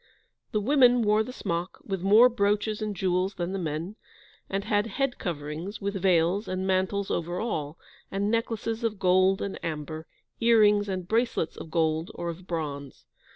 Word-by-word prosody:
The 215 - +1
women 245 0 +4
wore 210 0 +3
the 250 - -4
smock, 175 -6 -3
with 195 -3 -3
more 210 +6 +7
brooches 210 -2 0
and 210 -1 -2
jewels 185 +1 0
than 175 -1 -3
the 195 - -2
men; 165 +5 -4 0.5
and 195 +1 -2
had 205 +1 +1
head 275 +1 -2
coverings, 160 +4 -5
with 200 0 -2
veils, 180 +2 +2
and 185 0 -2
mantles 190 +1 0
over 175 +2 -2
all, 160 -9 -3 0.3
and 200 +2 -1
necklaces 230 0 -2
of 220 -2 -1
gold 185 +1 +3
and 200 - -5
amber, 155 0 -5 0.3
earrings, 210 -3 +4
and 185 -2 -3
bracelets 230 -6 0
of - - -9
gold 160 0 0
or 170 - -4
of 175 +2 -8
bronze. 145 -5 -5
195 Hz, 165 wpm, -27 LUFS, 170-215 Hz, 0.5 s, more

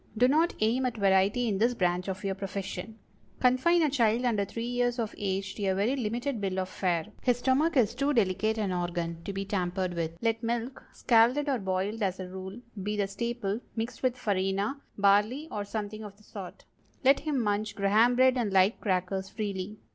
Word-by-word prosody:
Do 245 +3 +5
not 315 +5 +2
aim 245 +4 +2
at 240 - -4
variety 200 +4 +3
in 200 -3 0
this 240 +3 +2
branch 180 -2 0
of 190 +1 -4
your 195 -1 0
profession. 195 +1 -5 0.4
Confine 260 +7 +4
a 305 - +3
child 235 -2 +2
under 215 -5 +1
three 230 +4 -5
years 245 0 0
of 225 -3 -2
age 195 -1 -2
to 205 - -4
a 190 - +2
very 210 +7 +1
limited 240 0 -2
bill 190 -1 -2
of 185 0 -1
fare. 175 -4 0 0.2
His 245 -2 +2
stomach 275 +6 +2
is 230 -5 +3
too 275 +4 0
delicate 220 -2 +1
an 205 -3 -1
organ 175 -1 -3
to - - -3
be 195 0 -4
tampered 185 -2 -1
with. 165 -1 -3
Let 225 +1 0
milk—scalded 240 +2 +1
or 270 -4 +1
boiled, 190 +3 -2
as 190 -2 -1
a 185 - -5
rule—be 195 +2 -6
the 200 - +2
staple, 230 0 -3 0.2
mixed 230 +1 -4
with 255 -1 +1
farina, 200 +4 -1 0.2
barley, 210 +9 +3
or 205 - -3
something 215 +1 -5
of 200 -1 -10
the 215 - -22
sort. 195 -4 -9 0.4
Let 275 +1 +5
him 295 -3 -1
munch 210 -1 -1
Graham 215 +5 +4
bread 255 +1 +4
and 220 -4 0
light 190 +2 +3
crackers 190 0 -1
freely. 205 -1 -4
210 Hz, 195 wpm, -29 LUFS, 190-245 Hz, 0.4 s, Do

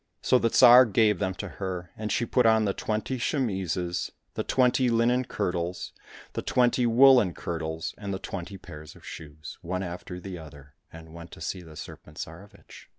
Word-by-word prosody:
— - - -50
So 125 - +4
the 115 - +2
Tsar 125 +3 +8
gave 105 -2 +3
them 95 0 -1
to - - -6
her, 90 -3 -6
and 110 -1 -4
she 120 - +1
put 120 0 +3
on 110 -1 +4
the 100 - 0
twenty 110 +6 -3
chemises, 95 - -1 0.2
the - - -3
twenty 125 0 +2
linen 120 +2 +2
kirtles, 90 -5 -3 0.4
the - - -3
twenty 125 0 +2
woollen 120 - +6
kirtles, 80 0 -4
and 100 -2 -5
the 95 - -2
twenty 95 +1 -7
pairs 75 -4 -11
of - - -16
shoes, 75 -1 -10
one 90 +2 -3
after 90 0 -7
the 90 -1 -7
other, 70 -3 -13 0.2
and 80 -1 -12
went 85 0 -10
to - - -11
see 95 - -4
the 80 -3 -13
Serpent 75 0 -11
Tsarevich. 90 +6 -11
95 Hz, 185 wpm, -27 LUFS, 85-115 Hz, 0.4 s, Tsar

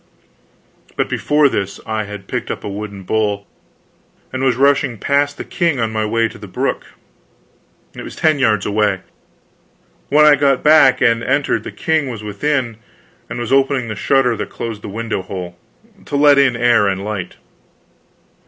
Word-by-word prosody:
But - - 0
before 150 0 +2
this 100 -7 -3
I 110 -1 -2
had 100 -1 -9
picked 125 -1 -4
up - - -5
a - - -5
wooden 100 -1 -6
bowl 105 0 -1 0.9
and 130 0 -2
was 130 -3 +2
rushing 140 -2 +2
past 145 +4 0
the - - -5
king 170 -7 -1
on 115 -1 -1
my 110 0 -1
way 115 +1 +1
to - - -12
the - - -9
brook. - - -3 1.1
It - - -9
was - - -9
ten 155 -2 +2
yards 110 -6 +2
away. 105 -2 0 1.1
When 150 +2 +5
I 150 - +8
got 140 -2 +2
back 150 -4 +5
and 115 0 +3
entered, 140 +3 0
the - - -7
king 160 -4 -1
was 115 -4 -7
within, 120 +2 -2 0.5
and - - -5
was 120 +2 -2
opening 135 -3 +2
the 105 - -4
shutter 130 +1 +2
that - - -4
closed 115 -3 -6
the - - -7
window 110 0 -3
hole, 90 -2 -7 0.5
to 145 - -4
let 145 0 +5
in 135 -3 +3
air 120 -3 +3
and 95 0 -2
light. 105 -4 -5
120 Hz, 170 wpm, -18 LUFS, 105-140 Hz, 1.1 s, I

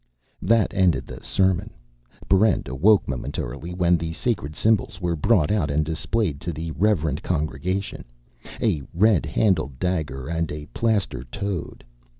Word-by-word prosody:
That 115 -2 +2
ended 95 -4 +2
the - - -9
sermon. 95 -2 +1 0.6
Barrent 95 +1 +3
awoke 90 - +3
momentarily 65 +4 -4
when 90 -1 +3
the 80 0 -4
sacred 80 -8 -2
symbols 110 -1 +1
were 85 -2 -1
brought 80 +1 +2
out 95 -9 +1
and 75 +2 +1
displayed 80 0 -1
to 85 - -3
the 80 +1 -5
reverent 80 -6 +1
congregation 90 +4 -2 0.5
a 75 - +1
red 105 -1 +3
handled 80 - +1
dagger, 75 -6 -2
and 85 0 -2
a 75 0 -6
plaster 100 - 0
toad. 95 +7 -5
85 Hz, 140 wpm, -24 LUFS, 75-100 Hz, 0.6 s, Barrent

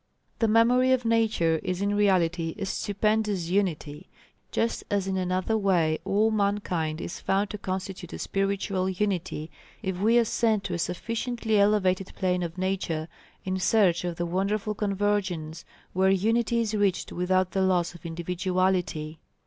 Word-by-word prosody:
The 225 - +3
memory 240 +4 +4
of 250 -2 0
Nature 220 -8 +2
is 185 -1 -3
in 200 +1 0
reality 175 -5 +2
a 200 - -3
stupendous 205 -2 0
unity, 175 -4 -1 0.4
just 230 - -1
as 200 -3 0
in 190 0 -2
another 185 +3 0
way 175 -7 +2
all 215 +3 +2
mankind 200 -7 -1
is 175 - -6
found 200 +1 0
to 210 - -6
constitute 185 -2 -5
a - - -6
spiritual 195 -1 -1
unity 185 -5 -2 0.3
if 190 -2 -2
we 225 +4 +4
ascend 225 -2 +2
to 180 - -4
a 170 - -2
sufficiently 225 +4 -1
elevated 195 -2 +2
plane 180 -1 0
of 170 0 -4
Nature 185 -4 -2 0.4
in 190 0 -1
search 185 -3 +3
of 175 -1 -3
the 175 - -2
wonderful 195 +4 -1
convergence 200 -6 -1 0.3
where 190 +1 +3
unity 225 +4 +2
is 220 -1 -2
reached 205 -3 0
without 185 +1 +1
the 195 - 0
loss 180 -2 +1
of 175 - -14
individuality. 175 -2 -1
190 Hz, 150 wpm, -27 LUFS, 175-210 Hz, 0.4 s, memory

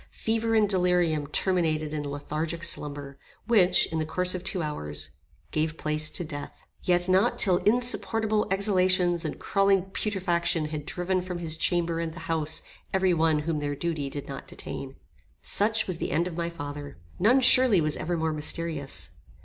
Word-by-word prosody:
Fever 225 0 0
and 215 -1 +4
delirium 180 -6 +2
terminated 155 -2 0
in 150 - -2
lethargic 155 +4 -4
slumber, 145 -3 -3 0.3
which, 185 -6 +4
in 160 - -1
the - - 0
course 180 +3 +1
of 180 -1 -5
two 185 -2 +1
hours, 75 - -4 0.4
gave 155 +1 -1
place 155 0 -2
to 175 - -4
death. 145 -3 -7 0.2
Yet 175 0 +1
not 190 +6 +3
till 185 -3 +4
insupportable 225 -1 +1
exhalations 185 -3 +2
and 155 - -4
crawling 195 -1 +1
putrefaction 170 -6 -1
had 150 -1 -6
driven 185 +1 -1
from 180 -1 -5
his 165 -2 -2
chamber 170 0 0
and 165 -1 -4
the 180 - -8
house 160 -1 -1 0.3
every 190 -1 +2
one 160 -2 +2
whom 160 -2 -1
their 145 -1 -2
duty 155 -3 -2
did 140 0 -7
not 135 -1 -7
detain. 135 -1 -7 0.5
Such 220 +2 +2
was 180 -3 -3
the - - -2
end 170 +3 +1
of 175 - -6
my 170 0 -2
father. 145 - -7 0.2
None 230 +8 +5
surely 255 -5 +6
was 155 -1 +1
ever 175 +1 -2
more 160 -1 -1
mysterious. 155 -2 -1
170 Hz, 170 wpm, -27 LUFS, 155-185 Hz, 0.5 s, surely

